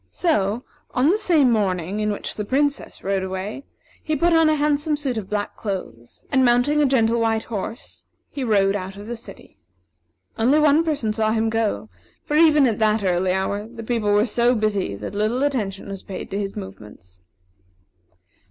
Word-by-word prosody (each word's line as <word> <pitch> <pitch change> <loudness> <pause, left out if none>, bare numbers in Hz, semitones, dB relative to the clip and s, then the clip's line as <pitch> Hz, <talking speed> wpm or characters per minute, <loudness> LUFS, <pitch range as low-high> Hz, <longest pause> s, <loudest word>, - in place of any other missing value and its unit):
So, 230 - 0 0.3
on 260 +4 +3
the 410 - +2
same 320 - +3
morning 190 -3 0
in 210 0 0
which 205 - -5
the 210 - -4
Princess 285 +6 -1
rode 195 0 0
away, 190 +7 -5 0.4
he 310 - -1
put 340 +4 +2
on 325 -1 +5
a 310 - +3
handsome 295 0 +1
suit 275 -4 -2
of 210 -4 -5
black 205 -1 -3
clothes, 120 - -7
and 265 -1 +3
mounting 250 +5 +3
a 290 - +4
gentle 235 -3 +2
white 225 -1 +1
horse, 225 +1 -7 0.3
he 275 - -4
rode 200 -4 +2
out 190 0 -5
of 205 - -9
the 240 +2 -5
city. 230 - -13 0.8
Only 255 +7 +4
one 305 +1 +4
person 285 -10 -1
saw 220 0 +1
him 225 0 0
go; 215 - -1 0.4
for, 295 - -2
even 305 -3 +6
at 230 -4 0
that 215 -1 +2
early 180 0 +1
hour, 200 +3 -2
the 230 0 -9
people 220 -3 0
were 205 +1 +4
so 240 +2 +2
busy 205 - -1
that 100 - -7
little 215 +6 0
attention 215 -9 -2
was 195 -1 -6
paid 190 - -8
to 200 - -2
his 200 -1 -4
movements. 105 - -11
220 Hz, 185 wpm, -22 LUFS, 200-270 Hz, 0.8 s, even